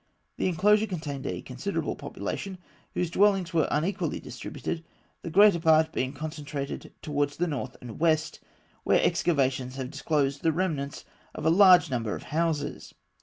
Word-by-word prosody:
The - - 0
enclosure 210 +5 +3
contained 150 -8 -5
a 90 - -4
considerable - - -3
population, 185 - -5 0.4
whose 175 -2 -1
dwellings 195 -2 +3
were 160 -3 +3
unequally 165 +7 -1
distributed, 165 - -6 0.4
the - - -5
greater 200 +1 +6
part 160 -1 +4
being 130 0 -1
concentrated 145 -1 -6
towards 145 -1 -1
the 175 - +1
north 145 -6 -4
and 120 -3 -9
west, 160 -1 +1 0.4
where - - +4
excavations 130 -5 +1
have 130 -1 -5
disclosed 140 -2 0
the 165 - +3
remains 155 -5 -2 0.3
of - - -5
a 160 - +5
large 185 -2 +7
number 115 -4 -1
of - - -8
houses. 160 -2 -2
155 Hz, 150 wpm, -27 LUFS, 140-175 Hz, 0.4 s, large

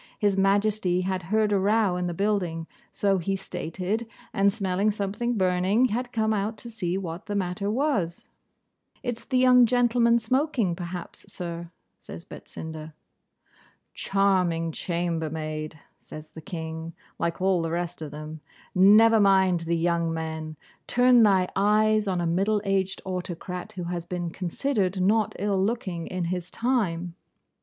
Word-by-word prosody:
His 205 -2 +2
Majesty 195 -1 +2
had 185 0 -2
heard 215 0 +2
a 200 - +3
row 205 -1 +2
in 180 0 -1
the 175 - -2
building, 180 -5 -1 0.3
so 195 -2 +1
he 195 +3 -1
stated, 190 +4 -3 0.3
and 200 -1 +3
smelling 195 -1 0
something 210 +4 -2
burning, 190 +6 +2
had 245 +3 -2
come 220 -2 +1
out 210 +2 -2
to 235 +2 -9
see 185 -5 -2
what 180 +1 -6
the 205 - -3
matter 190 +1 -1
was. 215 - -1 0.7
'It's 245 -2 -3
the 260 - 0
young 250 -1 +6
gentlemen 240 -1 +3
smoking, 255 - 0
perhaps, 175 0 -7
sir,' 170 -1 -6 0.3
says 170 - -10
Betsinda. 160 -1 -9 1.0
'Charming 180 -4 +1
chambermaid,' 160 -3 -3 0.2
says 155 0 -11
the 160 - -11
King 160 -1 -6 0.2
(like 170 0 -1
all 185 -1 +2
the 165 - -2
rest 175 0 -3
of 155 - -5
them), 155 +1 -8 0.3
'never 215 +4 +6
mind 190 -3 +4
the 165 0 -1
young 170 0 +1
men! 160 -1 -5 0.3
Turn 245 -1 +5
thy 195 -4 +4
eyes 215 +1 +3
on 185 -2 0
a 175 - 0
middle 195 +6 +1
aged 195 -1 0
autocrat, 180 -1 -5
who 180 - -5
has 170 0 -4
been 175 -1 -4
considered 190 +2 -1
not 210 +3 +2
ill 195 -1 0
looking 190 -6 -2
in 185 -1 -3
his 180 +1 -3
time. 180 -9 -1
190 Hz, 150 wpm, -26 LUFS, 170-215 Hz, 1.0 s, young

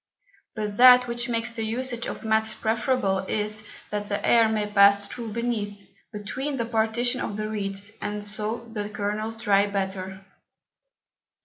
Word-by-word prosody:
But 210 -2 -4
that 250 0 +8
which 240 0 -2
makes 230 0 -1
the 230 -1 -4
Usage 240 +2 -2
of - - -6
Mats 220 0 +1
preferable, 220 -3 0
is, 210 +2 -2 0.3
that 205 0 -3
the 200 - 0
Air 230 -2 +5
may 215 -1 0
pass 200 -1 +5
through 230 -1 -7
beneath, 205 -4 -3 0.2
between 260 +7 -4
the 235 - -1
Partition 235 +2 0
of 205 - -3
the 215 0 -2
Reeds, 200 -1 -2
and 210 0 -3
so 215 +2 -3
dry 230 - -14
the 210 -1 -3
Kernels 215 +2 -4
better. 195 -1 0
215 Hz, 150 wpm, -25 LUFS, 205-230 Hz, 0.3 s, that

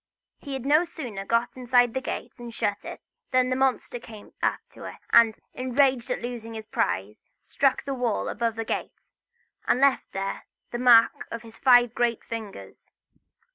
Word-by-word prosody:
He 280 - -7
had 265 -1 -5
no 300 +4 +4
sooner 245 - -7
got 230 +3 0
inside 245 -2 +3
the 265 - -2
gate, 260 - -6
and 240 -1 -8
shut 205 -3 -2
it, - - -8 0.3
than 255 -1 +2
the - - +2
monster 260 -2 0
came 220 -3 -13
up - - +1
to - - -11
it; - - -7 0.2
and, 230 -2 +6 0.2
enraged 260 -1 +1
at - - -3
losing 230 -2 -6
his 220 -1 -7
prize, 100 - -2 0.2
struck 275 -1 +1
the 275 - -2
wall 245 -4 -1
above 230 0 -1
the 225 0 -4
gate, - - -4 0.7
and 245 - +3
left 275 -1 +2
there 195 0 -4 0.3
the 240 - -3
mark 235 -2 +5
of 230 0 -6
his 225 -1 -14
five 245 -3 +5
great 240 -2 0
fingers. 220 -3 -8
240 Hz, 175 wpm, -26 LUFS, 225-255 Hz, 0.7 s, and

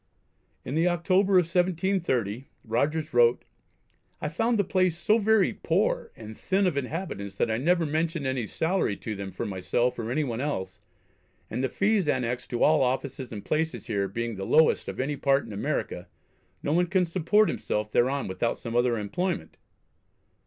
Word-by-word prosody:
In 130 - -4
the 165 +3 +2
October 185 +3 +2
of 180 -2 +6
1730 170 - 0 0.2
Rogers 150 +7 -1
wrote: 120 0 +4 0.7
"I 150 - -2
found 225 +9 +1
the 205 - +3
place 185 -2 +1
so 210 +7 +3
very 220 -2 +3
poor 185 +6 0
and 110 -1 -9
thin 195 - 0
of 180 -5 +1
inhabitants 135 - -4
that 115 - 0
I 110 - 0
never 170 +4 +2
mentioned 160 0 -1
any 130 -4 -1
salary 165 - 0
to 110 - -5
them 100 -1 -5
for 105 - -5
myself 105 +6 -1
or 115 -1 -3
any 145 +5 0
one 120 -3 -3
else, 95 -10 -3 0.7
and 125 +4 -2
the 130 - +1
fees 200 -4 +1
annexed 125 -3 -1
to 120 - 0
all 155 -1 +5
offices 130 0 -2
and 105 -3 -7
places 160 +1 -1
here 100 -3 -1
being 115 +2 -4
the 95 - -4
lowest 155 +7 +3
of - - -6
any 140 +2 -1
part 140 0 +2
in - - -8
America, 100 - -3 0.6
no 145 - 0
one 175 +2 +3
can 185 0 +2
support 185 +5 +3
himself 105 0 -2
thereon 135 +5 +1
without 95 +5 -1
some 115 -1 -6
other 120 -1 +2
employment." 105 - -3
140 Hz, 175 wpm, -27 LUFS, 115-175 Hz, 0.7 s, of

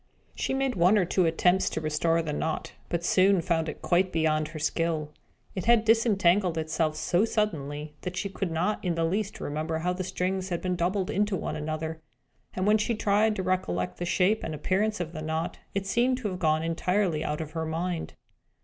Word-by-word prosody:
She - - -2
made 270 -1 0
one 185 +3 +4
or 190 - +3
two 180 0 +2
attempts 180 +3 +3
to - - -3
restore 160 +2 +1
the 150 -2 -3
knot, 160 +1 -2 0.2
but 170 -1 -1
soon 190 +1 +4
found 165 -2 0
it - - -8
quite 180 +1 +2
beyond 155 -1 +1
her 155 +1 -8
skill. 155 0 -1 0.4
It 185 - -4
had 230 -1 +5
disentangled 205 -6 +3
itself 155 0 0
so 175 +5 +1
suddenly 150 -9 -2
that 180 0 -5
she 200 - -1
could 195 -1 -3
not 175 +6 -1
in 175 -3 0
the 165 - 0
least 195 +5 -2
remember 155 +2 -2
how 180 +3 0
the 185 +1 -3
strings 185 +1 -2
had 175 -2 -1
been 180 -1 -1
doubled 185 +2 0
into 205 0 +1
one - - -3
another; 160 +1 -4 0.5
and 185 - -1
when 215 +1 +4
she 230 +2 0
tried 210 +1 +2
to 190 - -2
recollect 90 - -1
the 175 - -3
shape 190 +4 +2
and 160 - -3
appearance 200 +7 0
of 170 -1 -4
the 155 - -5
knot, 160 +2 -3 0.2
it 200 -1 -1
seemed 245 +6 +2
to 235 -5 -3
have 185 -1 -5
gone 155 -2 +2
entirely 170 0 0
out 150 0 -2
of 155 -2 -5
her 160 0 -3
mind. 170 +1 -3
175 Hz, 205 wpm, -28 LUFS, 160-195 Hz, 0.5 s, had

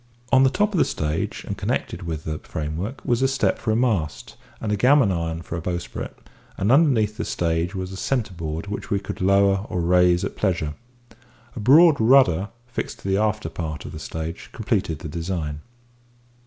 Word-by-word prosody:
On 130 - +6
the 135 - +6
top 210 +8 +1
of 180 - +1
the - - +6
stage, 75 +1 -2
and - - -4
connected 85 - -2
with 80 -3 -4
the 80 -1 -4
framework, 80 - -5
was 120 0 +1
a 135 - +4
step 135 +1 +1
for 120 - -3
a 110 - +3
mast, 105 - -1 0.2
and 105 - -3
a - - +2
gammon 125 0 +4
iron 85 -1 -2
for 85 - -6
a - - -4
bowsprit, 85 +1 -5 0.4
and 100 +4 +1
underneath 125 -8 +3
the - - -2
stage 85 +2 -1
was 95 0 -4
a - - -6
centre 110 0 -1
board 80 -1 -4
which 100 0 -6
we 100 - +1
could 95 - -7
lower 100 +1 +4
or 90 - -2
raise 90 0 +3
at - - -5
pleasure. 85 -7 0 0.8
A - - -5
broad 145 +6 +6
rudder, 110 -7 +5 0.2
fixed 120 0 -5
to - - -7
the 95 0 +2
after 105 -3 0
part 80 -1 -5
of - - -7
the 80 - -7
stage, 80 +2 -6
completed 100 -8 -1
the 75 - -7
design. 80 -2 -4
95 Hz, 195 wpm, -23 LUFS, 80-115 Hz, 0.8 s, On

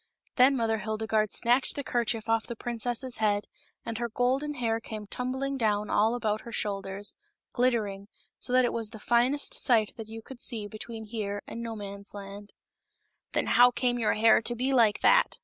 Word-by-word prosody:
Then 265 +2 +5
Mother 225 -2 0
Hildegarde 215 0 -1
snatched 245 +3 +2
the 285 - -3
kerchief 235 -3 -1
off 225 0 +1
of - - -16
the 235 - -5
princess's 240 +2 -3
head, 205 -1 +1 0.4
and 230 0 -4
her 235 0 -2
golden 260 +6 0
hair 230 -3 0
came 215 -2 -7
tumbling 265 +5 -3
down 210 -2 0
all 220 +3 +3
about 215 -3 -1
her 235 - -10
shoulders, 200 -1 -2 0.4
glittering, 215 -6 0 0.3
so - - +2
that 255 0 +5
it - - -1
was 225 -2 -1
the 220 - -10
finest 240 +6 +2
sight 225 -5 +2
that 225 -2 -7
you 225 0 -8
could 265 0 -11
see 225 -5 0
between 220 +1 -7
here 205 -2 -4
and 230 - -7
Nomansland. 205 -2 -8 0.4
" - - -49
Then - - +1
how 245 +1 +6
came 245 0 -1
your 225 - +2
hair 225 +1 +5
to 240 +2 -1
be 260 +3 0
like 225 -5 +4
that?" - - +4
225 Hz, 185 wpm, -28 LUFS, 215-245 Hz, 0.4 s, how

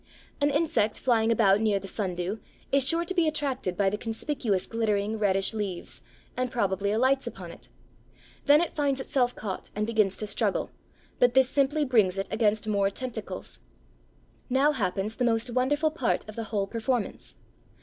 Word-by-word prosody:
An 285 - +4
insect 290 -8 +1
flying 230 -3 +2
about 210 -3 +4
near 215 -2 +2
the 195 0 -6
Sundew 185 0 -3 0.3
is 275 -1 +5
sure 335 +2 +2
to 375 - -4
be 345 -3 +2
attracted 270 - -2
by 200 - +2
the 210 +2 0
conspicuous 225 -3 -2
glittering, 215 -1 -1
reddish 195 0 +2
leaves, 200 -5 -4 0.3
and 255 0 -1
probably 200 -4 0
alights 260 +5 +2
upon - - -7
it. - - -14 0.8
Then 295 +2 +6
it 345 - -2
finds 280 -3 0
itself 250 -2 0
caught 195 -3 -5
and 210 +1 0
begins 215 -4 +1
to 215 - -3
struggle, 210 - 0 0.5
but 245 0 +4
this 265 -1 +5
simply 290 +2 +1
brings 215 -8 +3
it 195 - -1
against 215 -1 +1
more 200 -2 +2
tentacles. 250 +4 -6 0.9
Now 270 +4 +3
happens 200 -4 -2
the - - 0
most 230 0 +1
wonderful 290 +5 +1
part 275 -9 -1
of 215 - -9
the 230 - -4
whole 205 -3 -1
performance. 230 +2 -3
225 Hz, 170 wpm, -27 LUFS, 205-265 Hz, 0.9 s, Then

